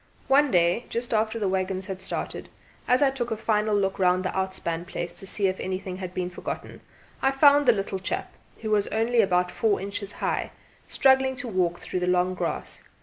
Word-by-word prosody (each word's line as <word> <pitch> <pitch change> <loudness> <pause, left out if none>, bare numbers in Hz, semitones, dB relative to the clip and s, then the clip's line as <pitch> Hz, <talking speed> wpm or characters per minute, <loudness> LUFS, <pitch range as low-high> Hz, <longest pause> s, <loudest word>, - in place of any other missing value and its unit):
One 285 +2 +5
day 175 +3 +2
just 235 +1 -2
after 220 +1 +1
the 210 -3 0
waggons 190 0 -1
had 190 -1 -6
started, 190 - -4 0.4
as 250 +3 +4
I 275 - +4
took 245 -3 -3
a 225 - -2
final 215 -1 +1
look 195 -1 0
round 185 0 +3
the 185 - -2
outspan 190 -3 -1
place 175 -3 -4
to 185 +3 -5
see 200 +1 +1
if 190 0 0
anything 185 0 -4
had 185 -2 -6
been 180 0 -2
forgotten, 180 - -6 0.4
I 270 - +4
found 285 +1 +5
the - - +9
little 195 -3 -2
chap 185 - -4 0.3
who 220 -1 -3
was 205 -1 +2
only 230 +1 +2
about 180 -3 +1
four 215 -3 +1
inches 200 +1 -4
high - - -2 0.3
struggling 265 0 +3
to 250 -1 -5
walk 180 -5 0
through 185 - -3
the 180 - -1
long 180 0 +2
grass. - - -4
195 Hz, 205 wpm, -26 LUFS, 185-230 Hz, 0.4 s, the